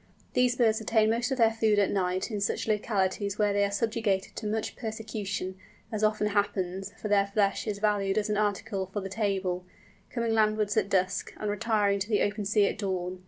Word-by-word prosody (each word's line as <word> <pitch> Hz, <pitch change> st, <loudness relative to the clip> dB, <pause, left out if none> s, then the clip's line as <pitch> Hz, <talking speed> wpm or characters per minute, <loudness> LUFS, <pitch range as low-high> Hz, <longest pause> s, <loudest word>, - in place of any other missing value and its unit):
These 250 Hz, -1 st, +3 dB
birds 225 Hz, -3 st, +2 dB
obtain 220 Hz, 0 st, +3 dB
most 235 Hz, +3 st, 0 dB
of 265 Hz, -, -1 dB
their 225 Hz, -2 st, +5 dB
food 220 Hz, -2 st, +2 dB
at 200 Hz, -1 st, +3 dB
night 185 Hz, +2 st, -1 dB
in 205 Hz, -2 st, -2 dB
such 200 Hz, -, -1 dB
localities 205 Hz, -2 st, 0 dB
where 210 Hz, -1 st, +2 dB
they 200 Hz, 0 st, +2 dB
are 200 Hz, -, +2 dB
subjected 210 Hz, -2 st, -1 dB
to 215 Hz, -, -4 dB
much 215 Hz, +1 st, -2 dB
persecution, 210 Hz, -4 st, -4 dB, 0.3 s
as 215 Hz, -1 st, -2 dB
often 215 Hz, 0 st, +2 dB
happens, 195 Hz, -2 st, -1 dB
for -, -, -4 dB
their 200 Hz, -1 st, +3 dB
flesh 200 Hz, 0 st, 0 dB
is 210 Hz, -2 st, -1 dB
valued 205 Hz, -1 st, +1 dB
as 210 Hz, 0 st, +1 dB
an 210 Hz, -, 0 dB
article 205 Hz, -1 st, -1 dB
for 190 Hz, +3 st, -4 dB
the 195 Hz, -, -5 dB
table, 190 Hz, -3 st, -1 dB, 0.5 s
coming 235 Hz, -2 st, -1 dB
landwards 215 Hz, -1 st, +2 dB
at -, -, +1 dB
dusk, 185 Hz, -2 st, 0 dB
and 210 Hz, -1 st, -2 dB
retiring 205 Hz, -1 st, +1 dB
to 195 Hz, +3 st, -3 dB
the 210 Hz, -, +3 dB
open 205 Hz, 0 st, -1 dB
sea 205 Hz, +1 st, +3 dB
at 195 Hz, -, -2 dB
dawn. 185 Hz, -2 st, -2 dB
205 Hz, 205 wpm, -28 LUFS, 195-220 Hz, 0.5 s, their